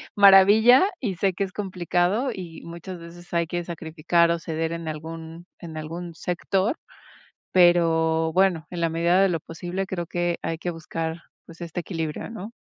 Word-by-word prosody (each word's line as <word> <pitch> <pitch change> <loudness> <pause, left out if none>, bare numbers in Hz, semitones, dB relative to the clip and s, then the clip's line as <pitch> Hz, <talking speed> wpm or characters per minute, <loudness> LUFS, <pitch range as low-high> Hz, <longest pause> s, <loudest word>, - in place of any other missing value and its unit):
maravilla 205 - +7
y 205 -8 -2
sé 190 +2 +1
que 195 +2 -1
es 185 - -11
complicado 190 - 0
y 175 -4 -8
muchas 170 +2 -8
veces 175 +1 -13
hay 170 -1 +1
que 175 +1 -3
sacrificar 170 0 +1
o 170 - 0
ceder 160 0 -3
en 165 -1 -6
algún 160 +2 -8
en 160 -2 -8
algún 165 +2 -6
sector, 190 - -1 0.7
pero, 165 -2 +4
bueno, 185 -3 +2
en 175 -1 -5
la 165 - +2
medida 170 +3 +2
de 195 - +4
lo 170 -2 -1
posible, 175 +4 -5
creo 175 -2 -3
que 175 0 -1
hay 165 0 -2
que 175 - -3
buscar, 165 0 -5 0.3
pues, 165 +1 -14
este 170 0 -5
equilibrio, 165 -3 -4
¿no? 225 -1 -7
170 Hz, 170 wpm, -24 LUFS, 165-185 Hz, 0.7 s, maravilla